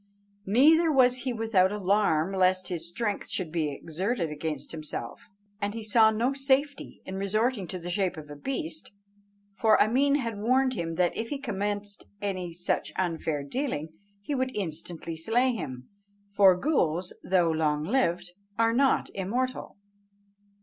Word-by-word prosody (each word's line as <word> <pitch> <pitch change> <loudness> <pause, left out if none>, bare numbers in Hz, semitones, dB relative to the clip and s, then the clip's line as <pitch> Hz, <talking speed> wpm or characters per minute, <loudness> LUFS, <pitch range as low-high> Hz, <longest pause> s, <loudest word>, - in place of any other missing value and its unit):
Neither 315 - +5
was 255 -3 +4
he 255 0 -3
without 220 -5 +2
alarm 195 -4 +1
lest 185 -1 +2
his 170 -2 -3
strength 205 +3 -3
should 175 -5 -3
be 160 -3 0
exerted 170 - -3
against 150 +1 -4
himself, 155 - -7 0.3
and 205 +2 -2
he 225 - -5
saw 220 +1 +5
no 230 +5 0
safety 275 +1 0
in 190 - -5
resorting 210 +1 0
to 185 - -5
the 175 0 -6
shape 185 -1 0
of 155 -1 -8
a - - -7
beast, 275 - -3 0.6
for 220 +2 +4
Ameen 270 +6 +3
had 230 -7 -2
warned 255 +4 +2
him 165 -6 -3
that 180 0 +1
if 225 0 -3
he 290 - -2
commenced 205 -5 -4
any 185 -4 -3
such 175 +2 -2
unfair 165 -5 -1
dealing, 160 - -3 0.3
he 290 - -3
would 260 -1 -1
instantly 165 -2 -4
slay 240 +10 +2
him; 130 - -6 0.4
for 195 -3 +6
ghools, 180 - 0
though 175 -3 +2
long 150 -2 0
lived, 180 -4 0 0.3
are 230 0 +3
not 270 +2 +2
immortal. 240 +8 -3
200 Hz, 150 wpm, -28 LUFS, 170-245 Hz, 0.6 s, for